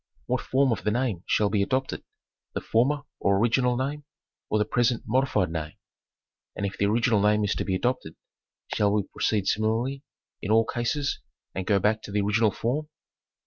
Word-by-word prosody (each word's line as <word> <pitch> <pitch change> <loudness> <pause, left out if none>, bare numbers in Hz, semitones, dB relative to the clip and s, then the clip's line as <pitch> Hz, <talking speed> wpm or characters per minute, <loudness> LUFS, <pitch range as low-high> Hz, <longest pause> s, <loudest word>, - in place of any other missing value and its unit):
What - - 0
form 135 0 +2
of 115 - -2
the - - +1
name 115 -5 0
shall 105 -2 +2
be 105 -1 +2
adopted? 130 +6 -1 0.5
The - - 0
former 140 +6 +1 0.2
or 100 0 +2
original 120 +3 +2
name 140 +3 -2 0.5
or 110 - +2
the 105 - +2
present 120 +1 +1
modified 115 -7 +1
name? 80 -2 -4 0.8
And 100 - -2
if 100 - -3
the 100 - +1
original 115 0 +2
name 105 +1 +3
is 105 - +1
to - - -2
be 95 - -1
adopted, 95 -7 -1 0.6
shall 105 -1 +2
we 105 -1 +2
proceed 100 +1 -1
similarly 115 +7 0 0.4
in - - -4
all 110 +1 +5
cases 130 +5 -1 0.3
and 95 0 -4
go 100 - +4
back 105 +3 +1
to 105 - -9
the 105 0 +1
original 105 +2 +3
form 130 +9 -2
110 Hz, 185 wpm, -26 LUFS, 100-125 Hz, 0.8 s, all